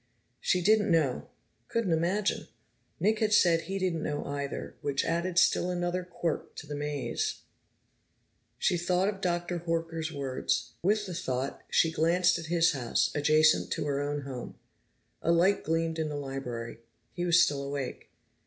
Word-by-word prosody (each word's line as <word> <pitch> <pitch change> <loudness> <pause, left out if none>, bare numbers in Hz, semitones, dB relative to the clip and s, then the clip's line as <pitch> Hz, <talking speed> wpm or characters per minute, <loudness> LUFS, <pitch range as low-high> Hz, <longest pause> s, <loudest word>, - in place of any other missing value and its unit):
She 180 -1 +1
didn't 215 +2 +4
know, 155 -7 +1 0.4
couldn't 230 -6 -1
imagine. 185 +6 0 0.5
Nick 215 +3 +2
had 215 -1 +1
said 170 -5 +5
he 195 +4 -4
didn't 180 -4 -1
know 150 -1 -3
either, 140 0 -4
which 140 -1 0
added 170 +2 -1
still 180 0 +4
another 175 0 -1
quirk 175 -2 -4
to - - -8
the 150 - -6
maze. 145 -1 -2 1.2
She 175 - +1
thought 180 +3 +1
of 200 -2 -6
Dr. 175 -1 -1
Horker's 165 -1 -2
words. 135 -4 -2
With 210 +3 +2
the 185 - -6
thought, 130 -4 -3
she 165 - +3
glanced 175 +2 +3
at 165 - -7
his 170 0 +3
house, 130 -6 0
adjacent 155 +1 +4
to - - -3
her 140 -1 0
own 145 0 -2
home. 130 -3 -7 0.7
A 165 - +2
light 175 +4 +3
gleamed 165 0 -1
in 155 -1 -1
the 150 - -4
library; 125 -5 -5 0.3
he 175 - -3
was 175 0 +5
still 145 -5 +3
awake. 140 -2 -5
165 Hz, 160 wpm, -29 LUFS, 145-180 Hz, 1.2 s, said